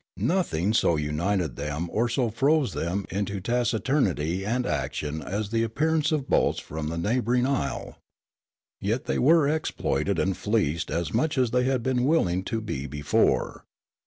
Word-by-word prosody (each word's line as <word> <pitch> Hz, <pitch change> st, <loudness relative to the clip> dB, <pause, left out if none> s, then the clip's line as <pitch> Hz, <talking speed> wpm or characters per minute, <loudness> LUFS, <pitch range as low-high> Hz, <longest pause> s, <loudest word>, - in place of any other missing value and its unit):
Nothing 110 Hz, -, 0 dB
so 85 Hz, -6 st, +3 dB
united 75 Hz, +1 st, -1 dB
them 75 Hz, +4 st, -3 dB
or 120 Hz, +3 st, +1 dB
so 120 Hz, -1 st, 0 dB
froze 140 Hz, +4 st, +2 dB
them 90 Hz, +4 st, -2 dB
into 100 Hz, 0 st, -2 dB
taci 120 Hz, +3 st, 0 dB
turnity 95 Hz, -, 0 dB
and 120 Hz, +5 st, -1 dB
action 75 Hz, -9 st, -2 dB
as 100 Hz, +7 st, -3 dB
the 115 Hz, 0 st, +1 dB
appearance 155 Hz, +7 st, +1 dB
of 145 Hz, -3 st, -1 dB
boats -, -, +2 dB
from 80 Hz, 0 st, -5 dB
the 85 Hz, +1 st, -3 dB
neighbouring 120 Hz, +6 st, +1 dB
isle. 135 Hz, -, -2 dB, 0.8 s
Yet 110 Hz, +6 st, -1 dB
they -, -, -1 dB
were 155 Hz, +2 st, +5 dB
exploited 155 Hz, +1 st, -1 dB
and 95 Hz, 0 st, +1 dB
fleeced 85 Hz, -7 st, 0 dB
as 85 Hz, +2 st, -2 dB
much 145 Hz, +6 st, +1 dB
as 125 Hz, -3 st, +2 dB
they 125 Hz, +1 st, +2 dB
had 130 Hz, -2 st, 0 dB
been 125 Hz, -1 st, +1 dB
willing 95 Hz, -, +2 dB
to 115 Hz, -1 st, -2 dB
be 70 Hz, -10 st, -4 dB
before. 75 Hz, +1 st, 0 dB
110 Hz, 160 wpm, -26 LUFS, 85-130 Hz, 0.8 s, were